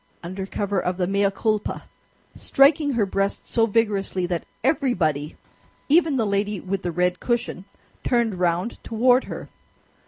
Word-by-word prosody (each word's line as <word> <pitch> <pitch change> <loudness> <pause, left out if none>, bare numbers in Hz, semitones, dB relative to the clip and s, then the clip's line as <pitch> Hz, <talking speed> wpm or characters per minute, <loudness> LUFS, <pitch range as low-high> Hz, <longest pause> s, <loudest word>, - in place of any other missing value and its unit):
under 190 +3 -5
cover 200 -1 -1
of 180 0 -2
the 180 - +1
mea 200 +2 +2
culpa, 210 +2 -2 0.5
striking 285 +1 +3
her 230 -4 +2
breast 195 +1 -2
so 225 -1 +2
vigorously 200 -4 0
that 175 -1 -3 0.2
everybody, 180 - 0 0.5
even 315 -1 +4
the 225 - +1
lady 200 0 -1
with 190 +1 -3
the 175 - -2
red 180 +1 0
cushion, 240 -6 -2 0.4
turned 235 -6 +1
round 180 +5 -1
toward 250 +3 +3
her. - - -7
200 Hz, 145 wpm, -23 LUFS, 185-235 Hz, 0.5 s, even